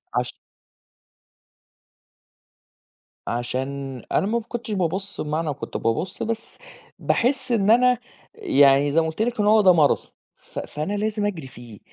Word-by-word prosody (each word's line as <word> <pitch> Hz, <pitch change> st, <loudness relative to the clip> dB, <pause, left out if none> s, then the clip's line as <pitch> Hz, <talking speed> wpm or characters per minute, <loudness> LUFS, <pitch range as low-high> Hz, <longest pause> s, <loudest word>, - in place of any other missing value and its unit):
عش -, -, -1 dB, 2.9 s
عشان 130 Hz, +2 st, -3 dB
أنا 195 Hz, -, +2 dB
م 215 Hz, -, -2 dB
ما 235 Hz, -, +2 dB
كنتش 230 Hz, 0 st, -6 dB
بابُص 190 Hz, +1 st, -2 dB
بمعنى 155 Hz, 0 st, -1 dB
كُنت -, -, -6 dB
بابُص 155 Hz, -, -2 dB
بس، 230 Hz, 0 st, -4 dB, 0.4 s
باحِس 255 Hz, +1 st, 0 dB
إن 215 Hz, -2 st, +3 dB
أنا، 250 Hz, +1 st, +5 dB, 0.4 s
يعني 145 Hz, -, +4 dB
زي 165 Hz, +3 st, +4 dB
ما 160 Hz, -, -1 dB
قُلت 160 Hz, +6 st, -4 dB
لِك 235 Hz, 0 st, -1 dB
إنه 210 Hz, 0 st, +3 dB
هو 215 Hz, 0 st, +6 dB
ده 185 Hz, -3 st, +6 dB
ماراثون 155 Hz, -4 st, +2 dB, 0.3 s
ف -, -, -8 dB
فأنا 155 Hz, +7 st, -4 dB
لازم 210 Hz, 0 st, -1 dB
أجري 175 Hz, -9 st, -3 dB
فيه، 120 Hz, -5 st, -12 dB
190 Hz, 140 wpm, -23 LUFS, 140-220 Hz, 2.9 s, هو